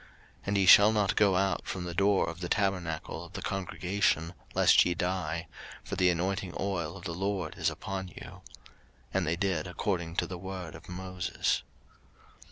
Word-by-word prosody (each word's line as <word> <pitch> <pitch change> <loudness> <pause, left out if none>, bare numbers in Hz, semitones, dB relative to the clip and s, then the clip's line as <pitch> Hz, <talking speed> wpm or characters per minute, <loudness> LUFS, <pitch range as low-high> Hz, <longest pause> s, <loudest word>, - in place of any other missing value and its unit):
03:010:007 - - -22 0.4
And 100 0 +1
ye 95 - +3
shall 100 +3 +9
not 105 -3 +1
go 100 -3 +4
out 95 +1 0
from 90 - -3
the 85 -1 -5
door 100 +2 +3
of 85 +1 -5
the 90 -1 -4
tabernacle 90 -5 -1
of - - -13
the - - -5
congregation, 90 -2 0 0.2
lest - - +6
ye 90 - 0
die: 85 -2 -2 0.4
for - - -5
the 90 -1 +4
anointing 95 +2 -1
oil 90 -3 -2
of 95 - -12
the 85 -3 -4
LORD 95 -2 -2
is - - +1
upon 95 -1 -5
you. 90 - -11 0.7
And 95 -3 +1
they 80 - +1
did 90 -3 -1
according 90 -2 -2
to - - +1
the 90 -2 -7
word 95 -3 -6
of - - -12
Moses. 90 0 -1
90 Hz, 180 wpm, -30 LUFS, 85-95 Hz, 0.7 s, shall